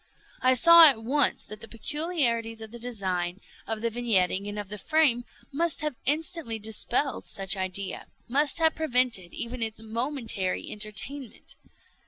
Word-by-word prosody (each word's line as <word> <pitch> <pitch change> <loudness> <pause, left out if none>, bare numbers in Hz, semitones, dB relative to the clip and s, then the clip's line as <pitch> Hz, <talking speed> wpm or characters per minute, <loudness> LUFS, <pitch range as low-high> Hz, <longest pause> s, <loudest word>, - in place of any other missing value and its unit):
I 255 0 +4
saw 335 +6 +9
at 225 -5 -1
once 275 +4 0
that 215 +1 -10
the 225 - -8
peculiarities 235 -4 -1
of 220 - -10
the 240 - -10
design, 190 -6 -3 0.3
of 220 -1 -3
the 230 0 -1
vignetting, 205 -4 0
and 205 - -7
of 205 -2 -6
the 210 0 -6
frame, 275 -5 +2 0.3
must 330 +2 0
have 300 -3 -2
instantly 300 -4 +1
dispelled 220 +5 0
such 195 0 0
idea—must 200 +9 -1
have 320 -1 +3
prevented 250 - 0
even 235 +1 -5
its 220 -1 -2
momentary 225 -4 -2
entertainment. 215 +5 -4
235 Hz, 145 wpm, -26 LUFS, 210-285 Hz, 0.3 s, saw